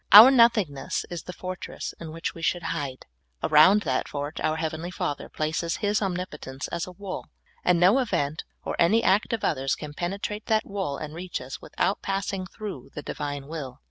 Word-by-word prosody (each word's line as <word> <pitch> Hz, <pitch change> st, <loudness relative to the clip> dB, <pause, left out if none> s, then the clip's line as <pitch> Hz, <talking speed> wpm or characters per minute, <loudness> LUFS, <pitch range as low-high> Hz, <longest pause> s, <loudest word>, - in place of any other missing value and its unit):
Our 220 Hz, +6 st, +12 dB
nothingness 220 Hz, -, +3 dB
is 175 Hz, -, -4 dB
the -, -, -7 dB
fortress 185 Hz, 0 st, -6 dB
in 165 Hz, -2 st, -7 dB
which 165 Hz, +1 st, -3 dB
we 165 Hz, -, -10 dB
should 175 Hz, +1 st, 0 dB
hide; 140 Hz, -5 st, -4 dB, 0.4 s
around 175 Hz, +7 st, +6 dB
that 130 Hz, -5 st, 0 dB
fort 145 Hz, +1 st, -4 dB
our 155 Hz, -, +1 dB
heavenly 160 Hz, +1 st, -3 dB
Father 145 Hz, -5 st, -3 dB
places 160 Hz, +2 st, -1 dB
His 210 Hz, 0 st, +1 dB
omnipotence 175 Hz, -8 st, -3 dB
as 170 Hz, +1 st, -3 dB
a -, -, -7 dB
wall, 195 Hz, +1 st, -6 dB, 0.4 s
and 180 Hz, -1 st, +4 dB
no 190 Hz, +9 st, +6 dB
event 170 Hz, -, 0 dB, 0.2 s
or -, -, -3 dB
any 220 Hz, +7 st, +4 dB
act 200 Hz, +3 st, +3 dB
of 230 Hz, -2 st, -1 dB
others 135 Hz, -4 st, +1 dB
can 150 Hz, -1 st, -7 dB
penetrate 200 Hz, +5 st, -3 dB
that 220 Hz, -1 st, +2 dB
wall 190 Hz, -8 st, -3 dB
and 155 Hz, -1 st, -6 dB
reach 175 Hz, +2 st, -4 dB
us, 130 Hz, +1 st, -7 dB
without 195 Hz, -, -1 dB
passing 195 Hz, -1 st, -2 dB
through 210 Hz, +1 st, -7 dB
the 150 Hz, -, -5 dB
Divine 145 Hz, -1 st, -4 dB
will. 140 Hz, -4 st, -6 dB
170 Hz, 185 wpm, -26 LUFS, 150-195 Hz, 0.4 s, Our